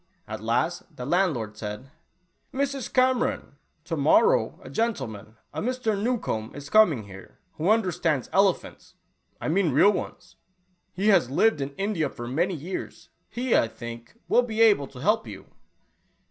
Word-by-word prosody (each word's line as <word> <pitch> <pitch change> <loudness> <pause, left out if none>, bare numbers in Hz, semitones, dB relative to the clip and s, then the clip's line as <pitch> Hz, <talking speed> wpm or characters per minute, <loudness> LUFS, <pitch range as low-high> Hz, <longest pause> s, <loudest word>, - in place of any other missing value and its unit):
At 110 -1 -6
last 160 - -1
the 125 - -6
landlord 145 - 0
said, 105 +5 -7 0.3
" 180 - -46
Mrs. 275 -1 -2
Cameron, 255 0 +1 0.3
to - - -3
morrow 485 +2 +3
a - - -10
gentleman, 120 - -3 0.2
a - - -3
Mr. 245 -2 -1
Newcombe, 200 - -2
is 145 0 -9
coming 170 - +5
here, 95 -1 -13 0.2
who 165 +5 0
understands 175 - +1
elephants 195 -2 0 0.2
— - - -44
I - - -4
mean 175 +2 +2
real 170 +10 +5
ones. 200 - -6 0.5
He 200 +4 0
has 190 - +4
lived 155 +3 +2
in 140 0 -4
India 195 -6 -1
for 120 -2 -8
many 170 +9 0
years. 170 +5 -7 0.2
He, 245 0 0
I - - +4
think, 120 - -10
will 245 - +4
be 225 -3 -5
able 205 -11 +5
to* 125 -2 -12
help 215 +7 +1
you." - - -9
175 Hz, 160 wpm, -26 LUFS, -, 0.5 s, coming